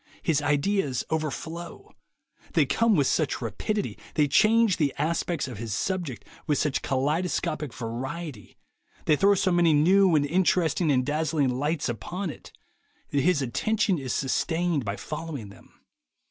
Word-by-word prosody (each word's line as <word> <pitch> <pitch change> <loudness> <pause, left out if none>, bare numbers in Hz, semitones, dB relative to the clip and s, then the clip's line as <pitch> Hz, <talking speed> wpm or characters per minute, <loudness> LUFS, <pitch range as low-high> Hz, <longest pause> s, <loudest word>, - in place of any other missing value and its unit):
His 155 -3 +2
ideas 145 -1 0
overflow; 160 +2 -4 0.6
they - - +4
come 230 -2 +2
with 145 -5 +3
such 150 +1 0
rapidity, 130 - -3 0.2
they 150 -2 +3
change 215 +6 +4
the 145 -3 +1
aspects 160 0 -1
of 120 -5 -8
his 110 -2 -3
subject 170 - -3 0.2
with 150 - +2
such 150 -3 0
kaleidoscopic 150 +1 -1
variety, 130 - -6 0.5
they 155 - +4
throw 200 +6 +4
so 185 0 +1
many 175 -2 +4
new 180 +4 +5
and 145 -1 +3
interesting 170 0 +2
and 130 -2 +2
dazzling 150 -2 0
lights 145 +5 -1
upon 170 - -4
it, - - -13 0.6
that 140 - +2
his 160 -2 +2
attention 200 - 0
is 130 -2 -4
sustained 160 +2 0
by 100 0 -2
following 150 -5 -6
them. 100 - -17
155 Hz, 145 wpm, -26 LUFS, 135-175 Hz, 0.6 s, new